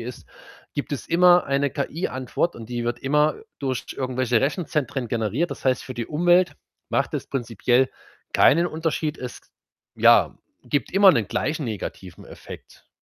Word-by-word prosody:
ist 120 +2 -8 0.5
gibt 145 - -3
es 140 - -4
immer 175 +1 +5
eine 140 0 +1
KI-Antwort, 140 +1 -2
und 115 -1 -10
die 120 -1 -3
wird 120 0 -2
immer 150 +3 +2 0.2
durch 130 -3 -2
irgendwelche 130 -3 0
Rechenzentren 140 - -1
generiert. 115 - -1
Das - - -11
heißt, 130 -2 +1
für 130 - -7
die 120 -1 -4
Umwelt 175 +3 +3 0.3
macht - - 0
das - - -4
prinzipiell 120 0 +1 0.4
keinen 170 +5 +5
Unterschied. 160 -2 -2
Es 125 -1 -7 0.5
ja, - - +5 0.3
gibt 145 -5 -1
immer 195 0 +7
'nen 110 - 0
gleichen 140 +8 -2
negativen 100 -5 -7
Effekt, - - -13
135 Hz, 150 wpm, -23 LUFS, 120-155 Hz, 0.5 s, immer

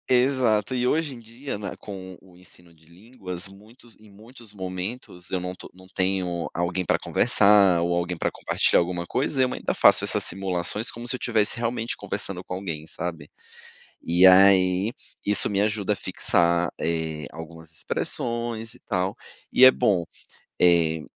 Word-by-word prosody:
exato. 125 -3 +1
E 125 0 0
hoje 150 -2 0
em 120 - -11
dia, 115 +2 -7
né, 100 - -5
com 95 -3 -9
o 90 -2 -20
ensino 90 -2 -17
de 80 0 -26
línguas, 90 -1 -7
muitos 110 +4 -18
em 110 -1 -18
muitos 110 +1 -15
momentos 95 0 -7
eu 95 - -1
não 90 +1 -6
to - - -12
não 95 0 -17
tenho 95 -2 -1
alguém 85 +1 -2
pra - - +1
conversar 100 -4 +4
ou 85 0 0
alguém 85 0 -2
pra - - -1
compartilhar - - +1
alguma 85 0 -3
coisa, 135 0 0
eu 130 -1 +1
ainda - - -3
faço - - +5
essas - - +1
simulações 95 +4 0
como 120 +1 -9
se 125 - +3
eu - - -7
estivesse 110 -2 0
realmente 115 0 -2
conversando - - -4
com - - -7
alguém, 80 -5 -6
sabe? 80 -3 -6 0.7
E 85 +3 +3
aí, 95 +2 +5 0.3
isso 105 +1 +4
me 100 -1 -1
ajuda 105 -1 0
a - - -5
fixar, 85 -1 +1
eh, 80 -2 -3
algumas 80 0 -11
expressões 115 +6 -3
e - - -18
tal, 90 +1 -2 0.4
e 130 - +7
é 130 - +10
bom. 100 -10 +1 0.6
Eh, 85 -3 +3
95 Hz, 165 wpm, -24 LUFS, 85-115 Hz, 0.7 s, é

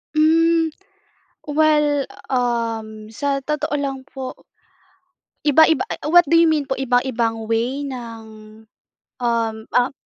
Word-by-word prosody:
Mm, 325 +1 +3 0.8
well, 295 -2 +2 0.2
um, 230 -4 -2
sa 275 +3 -2
totoo 300 0 -2
lang 270 -2 -3
po 265 -2 -7 1.1
iba-iba, 315 +4 +4
a - - -1
e - - -6
what 345 +1 +6
do 330 - +2
you 335 - +5
mean 310 -2 +2
po 265 -1 -3
iba-ibang 240 -3 0
way 240 +5 -1
ng, 225 -4 -9 0.6
um, 230 -2 0 0.2
ah 250 +1 +3
265 Hz, 120 wpm, -20 LUFS, 230-300 Hz, 1.1 s, what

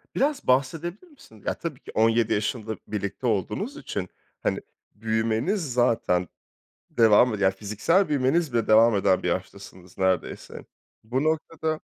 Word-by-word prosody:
Biraz 280 +1 0
bahsedebilir 165 - 0
misin? 275 -1 -18
Ya - - 0
tabii 155 -6 -6
ki - - -12
17 115 0 +3
yaşında 110 +1 -2
birlikte 105 +4 -3
olduğunuz 105 -5 -2
için - - -5 0.3
hani - - 0 0.3
büyümeniz 115 - -1
zaten 115 -7 +1 0.6
devam 115 +1 +5
eden, 100 -2 -2
yani 95 0 +4
fiziksel 110 - +1
büyümeniz 145 +1 +1
bile 115 -2 +1
devam 110 +1 +6
eden 95 -2 +2
bir - - -1
yaştasınız 95 0 -6
neredeyse. 95 -1 -2 0.4
Bu 125 +5 -1
noktada 155 0 -1
115 Hz, 135 wpm, -25 LUFS, 105-155 Hz, 0.6 s, devam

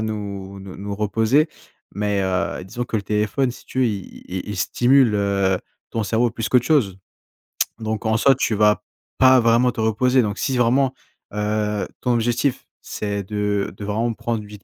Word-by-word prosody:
nous 100 -3 -5
nous 95 -1 -9
nous 100 +1 -5
reposer. 110 +8 +2 0.4
Mais, 105 -1 0
heu, 95 0 -1
disons 120 +6 -4
que 115 - -8
le 105 - -2
téléphone, 105 +6 0
si 120 - -12
tu - - -6
veux, - - +4
il 100 -5 -5
il 90 +2 -5
il 105 - -4
stimule, 125 +5 +3
heu, 100 -2 +1 0.3
ton 115 -2 -1
cerveau 115 +4 +1
plus 115 0 -3
qu'autre 125 -1 +3
chose. 125 - +2 0.8
Donc, 110 0 -3
en 110 0 +2
soi, 135 +4 +5
tu 115 -3 0
vas 105 0 +3 0.3
pas 130 -1 +6
vraiment 120 +2 +4
te 115 - -4
reposer. 125 +4 +3
Donc, 105 -2 -2
si 135 - -1
vraiment, 130 +2 +3 0.4
heu, 105 0 -1
ton 125 - +1
objectif, 120 +3 0 0.2
c'est 100 -1 -3
de 105 -1 -1
de 100 - -9
vraiment 110 +3 -1
prendre 115 0 -3
une 105 - -11
vite 105 -1 -12
110 Hz, 185 wpm, -22 LUFS, 100-120 Hz, 0.8 s, pas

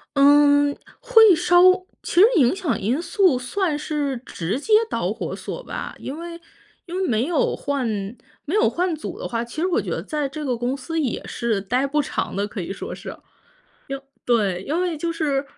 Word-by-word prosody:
嗯， 285 0 +5 0.2
会 450 -7 +6
稍 350 +1 +4 0.4
其 - - -6
实 - - +10
影 255 +2 +4
响 315 - -1
因 235 +10 0
素 360 - +2
算 305 +5 -1
是 295 -3 -2
直 185 +10 -3
接 435 +8 -1 0.2
导 - - -1
火 - - -5
索 - - -6
吧。 - - -6
因 275 - -6
为 340 0 -7 0.5
因 350 0 -7
为 380 - 0
没 230 0 +1
有 330 -4 +1
换 280 -3 -2 0.6
没 315 - -2
有 430 - +4
换 355 -1 -1
组 310 - -7
的 - - -4
话， 230 -1 -2
其 240 +7 -6
实 360 - +2
我 365 - +1
觉 - - -5
得 - - -2
在 300 -3 -2
这 305 +2 -6
个 250 -4 -1
公 245 +3 -1
司 325 +4 -4
也 265 -6 -1
是 225 -4 -1
待 250 +7 0
不 300 +2 +1
长 275 - -3
的， 200 +1 -1
可 205 -3 -6
以 175 - -5
说 - - -6
是。 - - -9
因 - - -6
为 - - -24 1.1
对， 205 -7 +1
因 310 - -2
为 360 -3 -1
就 335 +3 -2
是 285 -4 -1
290 Hz, 220 characters per minute, -22 LUFS, 245-340 Hz, 1.1 s, 实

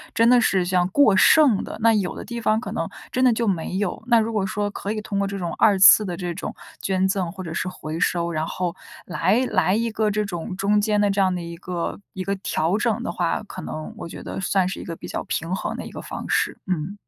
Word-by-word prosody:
真 230 +1 +4
的 245 0 +6
是 190 -4 +2
这 185 - -2
样 180 0 +3
过 220 -3 +5
剩 260 +1 +5
的， - - -7
那 230 0 +5
有 200 -4 0
的 - - -7
地 235 -1 -5
方 215 0 +2
可 - - -6
能 - - -3 0.2
真 255 - +1
的 250 - +6
就 230 0 0
没 180 -1 -1
有。 200 -2 -2
那 235 -2 +5
如 225 +1 -1
果 210 -3 +1
说 205 0 -2
可 200 +1 -4
以 215 - -2
通 200 -2 -3
过 200 - +1
这 200 0 -4
种 175 -3 -3
二 205 -3 +5
次 195 +2 +8
的 175 -3 -4
这 175 -2 -3
种 175 - -6 0.3
捐 190 -1 +1
赠 190 -3 -1
或 190 0 -8
者 165 -2 -6
是 180 - -2
回 160 -2 -6
收， 170 -1 0
然 155 0 -2
后 180 -1 -3 0.3
来 195 +8 +1
来 190 -1 +2
一 230 0 0
个 215 -1 +1
这 210 0 0
种 180 -1 -5
中 205 +1 +2
间 210 -1 +1
的 205 -1 +3
这 195 0 +1
样 185 -1 +2
的 175 - -4
一 170 0 -7
个 175 -1 -4
一 185 - -4
个 200 +1 -1
调 175 -1 0
整 230 +1 0
的 - - -2
话， 175 +4 -1
可 210 - -9
能 155 0 -6
我 170 - -7
觉 - - -9
得 - - -5
算 190 -1 +1
是 190 - -4
一 - - -7
个 165 - -6
比 - - -9
较 - - -4
平 165 +3 -3
衡 - - -3
的 - - -6
一 - - -9
个 - - -7
方 - - -7
式。 - - +1
嗯。 185 +2 -2
195 Hz, 290 characters per minute, -23 LUFS, 180-215 Hz, 0.3 s, 次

